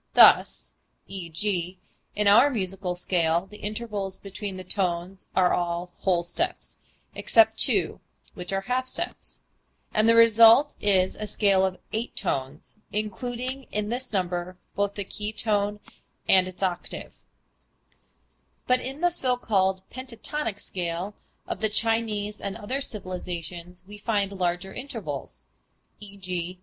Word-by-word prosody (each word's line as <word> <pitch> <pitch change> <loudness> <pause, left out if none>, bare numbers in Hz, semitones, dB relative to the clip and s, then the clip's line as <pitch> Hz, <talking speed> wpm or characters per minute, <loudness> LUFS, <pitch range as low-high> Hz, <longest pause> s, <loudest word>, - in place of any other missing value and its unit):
Thus 60 0 +6 0.3
e.g., 180 0 -3 0.4
in 210 0 +1
our 235 +8 +7
major 195 -7 -2 0.2
scale 170 -1 +1
the 210 +2 -13
intervals 210 -3 -4
between 195 0 -6
the 185 - -7
tones 185 0 -2
are 185 -1 +4
all 175 0 -1
whole 180 -3 +2
steps 345 - -3 0.3
except 335 - +4
two - - +3 0.3
(which 180 0 -6
are 195 0 0
half 250 +5 -1
steps), - - -3 0.5
and 215 +1 +4
the 230 - +6
result 230 +4 +7
is 190 -2 +3
a 215 - -5
scale 200 -3 +3
of 190 -1 0 0.2
eight 225 +3 -3
tones 135 +8 -3
(including 245 +5 -3
in 210 0 -1
this 250 +2 -3
number 180 -2 -2 0.2
both 200 0 -1
the 200 - -3
key 210 +2 -4
tone 210 -1 +1 0.5
and 185 -1 +5
its 185 +1 -7
octave): 180 -2 -4 1.5
but 250 0 +3
in 270 +4 -6
the 350 0 +3
so 255 -7 +2
called 190 -5 +1
pentatonic 255 -2 -4
scale 180 +2 -4 0.3
of - - -3
the 220 - +2
Chinese 215 -1 0
and 200 -1 -3
other - - -10
older 260 +7 -2
civilizations 180 - -5
we 205 +2 -11
find 205 -2 0
larger 180 0 -2
intervals 275 +3 -6 0.6
(_e.g. 185 -3 -5
200 Hz, 135 wpm, -26 LUFS, 180-225 Hz, 1.5 s, our